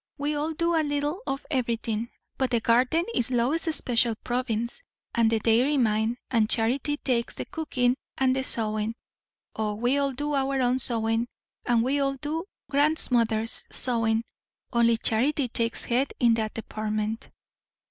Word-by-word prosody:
We 290 Hz, +1 st, -1 dB
all 300 Hz, +2 st, -1 dB
do 335 Hz, +2 st, 0 dB
a 325 Hz, -, +3 dB
little 295 Hz, +4 st, -1 dB
of 275 Hz, +1 st, -3 dB
everything; 230 Hz, -3 st, -1 dB, 0.3 s
but 260 Hz, -1 st, 0 dB
the 235 Hz, -, +2 dB
garden 250 Hz, +9 st, +3 dB
is 240 Hz, -1 st, +1 dB
Lois's 280 Hz, +7 st, +1 dB
special 235 Hz, -2 st, +1 dB
province, 240 Hz, -, -2 dB, 0.3 s
and 230 Hz, -1 st, +3 dB
the 225 Hz, -, +2 dB
dairy 235 Hz, +7 st, +3 dB
mine, 220 Hz, -1 st, +1 dB
and 225 Hz, -3 st, +3 dB
Charity 265 Hz, +6 st, +1 dB
takes 240 Hz, -5 st, -1 dB
the -, -, -5 dB
cooking 255 Hz, -6 st, 0 dB, 0.2 s
and 260 Hz, -1 st, +3 dB
the 265 Hz, -, 0 dB
sewing. 215 Hz, -2 st, 0 dB, 0.6 s
O, 215 Hz, -1 st, -1 dB
we 245 Hz, +6 st, +1 dB
all 280 Hz, -1 st, +1 dB
do 290 Hz, +3 st, -3 dB
our 270 Hz, -1 st, +1 dB
own 250 Hz, 0 st, +2 dB
sewing, 230 Hz, -1 st, +1 dB, 0.4 s
and 235 Hz, -2 st, +3 dB
we 275 Hz, +3 st, +1 dB
all 275 Hz, -1 st, +1 dB
do 305 Hz, +5 st, -4 dB, 0.2 s
grandmother's 245 Hz, -7 st, +1 dB
sewing; 230 Hz, -2 st, 0 dB, 0.5 s
only 235 Hz, -1 st, +4 dB
Charity 255 Hz, +5 st, +1 dB
takes 230 Hz, -1 st, -1 dB
head 255 Hz, +3 st, 0 dB
in 235 Hz, -2 st, +5 dB
that 220 Hz, -1 st, -1 dB
department." 215 Hz, 0 st, -3 dB
245 Hz, 155 wpm, -26 LUFS, 225-280 Hz, 0.6 s, in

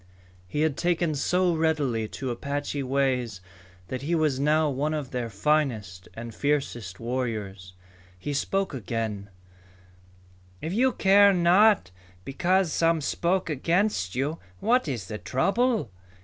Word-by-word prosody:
He 150 Hz, +11 st, -2 dB
had 155 Hz, -3 st, +1 dB
taken 170 Hz, -2 st, +1 dB
so 180 Hz, +5 st, +1 dB
readily 150 Hz, -9 st, 0 dB
to 130 Hz, +3 st, -5 dB
Apache 140 Hz, +3 st, -3 dB
ways 130 Hz, -6 st, 0 dB, 0.5 s
that 130 Hz, -, -4 dB
he 165 Hz, +5 st, 0 dB
was 155 Hz, -5 st, +1 dB
now 155 Hz, +2 st, +3 dB
one 145 Hz, +3 st, -1 dB
of 145 Hz, -4 st, -5 dB
their 125 Hz, -2 st, -3 dB
finest 105 Hz, -6 st, -1 dB
and 115 Hz, 0 st, -7 dB
fiercest 120 Hz, -10 st, -2 dB
warriors. 110 Hz, -7 st, -4 dB, 0.4 s
He 145 Hz, +10 st, -4 dB
spoke 195 Hz, +6 st, -1 dB
again: 110 Hz, -4 st, -4 dB, 1.3 s
"If 160 Hz, +3 st, -4 dB
you 255 Hz, +5 st, +3 dB
care 200 Hz, -1 st, +5 dB
not 180 Hz, -, +4 dB, 0.3 s
because 175 Hz, +5 st, +1 dB
some 165 Hz, -1 st, +2 dB
spoke 175 Hz, +5 st, 0 dB
against 165 Hz, -, 0 dB
you, 145 Hz, +5 st, -1 dB, 0.2 s
what 245 Hz, -4 st, +2 dB
is 120 Hz, -9 st, -3 dB
the 105 Hz, -1 st, -5 dB
trouble? 215 Hz, -, 0 dB
145 Hz, 130 wpm, -26 LUFS, 120-170 Hz, 1.3 s, care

